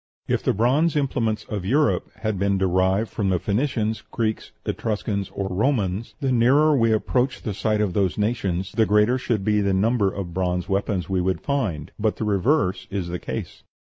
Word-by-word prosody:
If - - 0
the - - +1
bronze 135 - +2
implements 120 -7 0
of 105 -4 -5
Europe 145 +10 +1
had 110 -4 -1
been 100 0 +1
derived 95 +3 +1
from 100 -4 -1
the 90 - +2
Phoenicians, 110 - -1
Greeks, 110 -2 -2
Etruscans, 105 -2 -2
or 100 - -4
Romans, 105 0 -1
the 135 -3 0
nearer 140 +6 +4
we 115 -4 +3
approached 125 +4 0
the 105 - -2
site 105 +2 0
of 100 -4 0
those 95 -2 +1
nations 100 -4 -1
the 110 -2 +2
greater 105 +5 +3
should 110 -6 -1
be 105 -1 +2
the 100 -1 +1
number 105 0 +2
of 90 -4 -6
bronze 90 -1 -1
weapons 100 -2 -1
we 95 -1 0
would 95 +1 -1
find; 105 - -2
but 110 0 +1
the - - -4
reverse 100 - +1
is 95 -3 -3
the 90 0 -3
case. - - -6
105 Hz, 185 wpm, -23 LUFS, 95-120 Hz, -, nearer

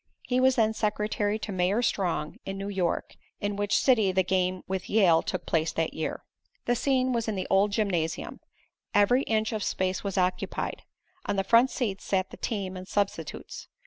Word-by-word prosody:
He 250 0 0
was 260 0 +4
then 220 -2 +3
secretary 210 -1 0
to 215 - -6
Mayor 190 +5 +1
Strong, 175 -8 -1
in 195 0 -5
New 195 +1 -4
York, 185 -4 -1 0.3
in 205 0 -2
which 205 +1 +1
city 220 -7 +4
the 190 0 +2
game 185 0 0
with 190 -1 -3
Yale 185 -7 +5
took - - -4
place 160 0 +1
that 165 -1 -1
year. 160 - -4 0.4
The 240 - +2
scene 260 0 +1
was 230 -1 -1
in 220 - -1
the 185 - -2
old 200 +2 +4
gymnasium. 180 -7 -1 0.6
Every 205 +6 +5
inch 220 -3 0
of 215 -2 -2
space 185 -1 -1
was 200 -2 -3
occupied. 180 0 -1 0.5
On 205 - 0
the 195 - +1
front 230 +6 +5
seats 210 -9 -3
sat 190 -1 0
the - - -10
team 195 -4 -3
and 185 0 -8
substitutes. 205 0 -3
200 Hz, 185 wpm, -28 LUFS, 185-220 Hz, 0.6 s, Yale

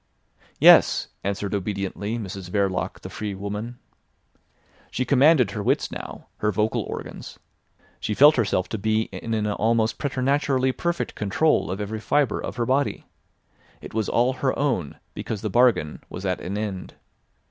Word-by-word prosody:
"Yes," - - +6
answered 100 0 -2
obediently 100 +2 -3
Mrs 95 -4 -6
Verloc 95 -1 -1
the - - -8
free 105 -2 -4
woman. 105 +5 -5 1.1
She 130 - -2
commanded 140 -4 +4
her 105 - -4
wits - - 0
now, - - -8
her 105 - 0
vocal 105 +2 0
organs; - - -7 0.6
she 105 - -2
felt 145 +5 +7
herself 100 -6 0
to 110 - -3
be 110 +2 +1
in 115 -1 -4
an 105 -1 -1
almost 110 +2 +1
preternaturally 135 -1 +1
perfect 170 +6 -2
control 105 - +1
of 95 +2 -3
every 105 +1 -4
fibre 135 +1 +1
of - - -5
her 120 -1 -1
body. 135 +3 0 0.7
It - - -11
was 110 -1 -1
all 125 +3 +2
her 130 0 -1
own, 120 - -1 0.2
because 105 -3 -5
the 105 - -2
bargain 120 -10 +2
was 95 - -7
at 90 -1 -1
an 100 +3 -4
end. 100 -3 -5
110 Hz, 155 wpm, -24 LUFS, 100-130 Hz, 1.1 s, felt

